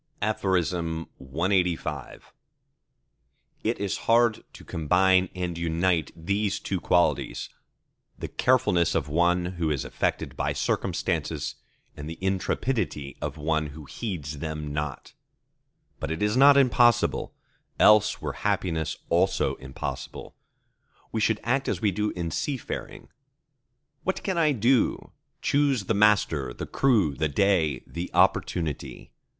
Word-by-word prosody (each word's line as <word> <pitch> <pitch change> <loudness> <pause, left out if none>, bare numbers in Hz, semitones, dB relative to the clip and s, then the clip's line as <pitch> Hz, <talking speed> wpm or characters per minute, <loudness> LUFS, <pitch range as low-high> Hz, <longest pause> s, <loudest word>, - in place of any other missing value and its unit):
CLXXXVI 90 -3 -1 1.4
It 115 +2 0
is 100 -2 -1
hard 115 -1 +4
to - - -14
combine 90 +4 +3
and 90 -2 -3
unite 85 -1 0
these 100 +4 -1
two 95 -2 -3
qualities, 80 -6 +1 0.7
the - - -5
carefulness 115 -10 +2
of 75 -4 0
one 85 +3 +2 0.2
who 80 - +2
is 70 -4 -1
affected - - -2
by - - -1
circumstances, - - -1 0.4
and 75 +1 -7
the 80 - -7
intrepidity 95 - -1
of 75 0 -4
one 80 0 0
who 75 +1 -10
heeds 75 - -5
them 75 -1 -4
not. 75 -2 -4 0.9
But - - -4
it 80 +4 -2
is 105 +2 +1
not 140 +2 +7
impossible: 120 -3 +3 0.4
else 105 0 +5
were - - -4
happiness 80 -3 -1
also 90 +3 +2
impossible. 65 0 -7 0.8
We 110 - -1
should 110 0 +2
act 135 +3 0
as - - -1
we 105 -3 +2
do 105 +3 -1
in 85 -2 -3
seafaring. 135 - -4 0.9
"What 190 - -2
can 190 -3 -1
I 155 -2 +4
do?"—Choose 130 +2 0
the 105 - 0
master, 100 - +2
the - - -5
crew, 110 - +2
the 75 +3 -1
day, 80 -4 +1
the 85 +2 -6
opportunity. 80 -5 0
90 Hz, 120 wpm, -26 LUFS, 80-105 Hz, 1.4 s, not